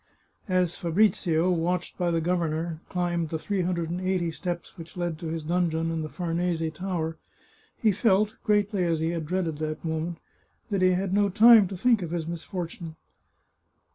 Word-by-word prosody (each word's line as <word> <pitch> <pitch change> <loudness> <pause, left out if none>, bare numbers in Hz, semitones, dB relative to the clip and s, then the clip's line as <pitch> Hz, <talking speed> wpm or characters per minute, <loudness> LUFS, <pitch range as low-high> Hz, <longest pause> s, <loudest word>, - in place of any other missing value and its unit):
As 180 -2 +1
Fabrizio, 175 -1 +2
watched 175 +1 -1
by 175 -2 0
the 165 -1 +1
governor, 165 -1 -1
climbed 175 -2 -1
the 160 - -2
three 195 +4 -2
hundred 170 -2 -1
and 180 +1 -3
eighty 185 -2 0
steps 175 +1 -5
which 170 0 -11
led 175 -3 -2
to 170 - -5
his 160 0 -3
dungeon 165 0 0
in 165 -1 -2
the 155 - -4
Farnese 170 -2 -1
Tower 165 -2 -3 0.6
he 220 - +3
felt, 210 +1 +2
greatly 205 -3 +2
as 165 -2 +1
he 160 +1 0
had 165 -3 -3
dreaded 175 -3 -1
that 155 +1 -4
moment, 160 +1 -2 0.5
that 195 -2 +1
he 185 0 +5
had 185 +1 -1
no 205 0 +3
time 220 0 +7
to 190 - -6
think 230 +1 +3
of 170 - -4
his 165 -1 -2
misfortune. 170 0 -6
175 Hz, 175 wpm, -27 LUFS, 165-185 Hz, 0.6 s, time